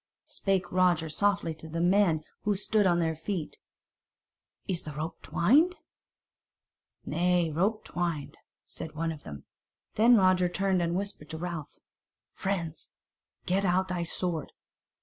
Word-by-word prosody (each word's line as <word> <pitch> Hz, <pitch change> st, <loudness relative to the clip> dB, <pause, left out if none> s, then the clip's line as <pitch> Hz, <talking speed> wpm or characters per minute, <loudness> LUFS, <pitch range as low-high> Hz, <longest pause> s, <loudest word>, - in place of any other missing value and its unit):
Spake 190 Hz, -3 st, -1 dB
Roger 175 Hz, -3 st, +3 dB
softly 200 Hz, 0 st, +1 dB
to 160 Hz, +1 st, -11 dB
the 165 Hz, +1 st, -3 dB
men 175 Hz, -3 st, +3 dB, 0.2 s
who 205 Hz, -1 st, +1 dB
stood 205 Hz, +1 st, +2 dB
on 175 Hz, -1 st, +3 dB
their 160 Hz, -1 st, 0 dB
feet: 165 Hz, 0 st, -4 dB, 1.1 s
"Is 185 Hz, -4 st, -1 dB
the 150 Hz, -, -7 dB
rope 155 Hz, +3 st, -5 dB
twined?" 300 Hz, -, +3 dB, 1.3 s
"Nay, 175 Hz, +1 st, +1 dB
rope 200 Hz, +8 st, 0 dB
twiner," 170 Hz, -5 st, -3 dB, 0.3 s
said 155 Hz, -, -7 dB
one 165 Hz, +1 st, -1 dB
of 155 Hz, -2 st, -8 dB
them. 70 Hz, -, -9 dB, 0.5 s
Then 235 Hz, +3 st, +6 dB
Roger 185 Hz, -3 st, +4 dB
turned 190 Hz, 0 st, +1 dB
and 170 Hz, 0 st, 0 dB
whispered 195 Hz, -6 st, -4 dB
to 160 Hz, -, -5 dB
Ralph: 165 Hz, -3 st, -5 dB, 0.6 s
"Friends. 170 Hz, -5 st, -3 dB, 0.6 s
Get 190 Hz, +2 st, +1 dB
out 190 Hz, 0 st, +2 dB
thy 180 Hz, -1 st, -1 dB
sword!" 170 Hz, -2 st, -2 dB
175 Hz, 135 wpm, -29 LUFS, 160-195 Hz, 1.3 s, Then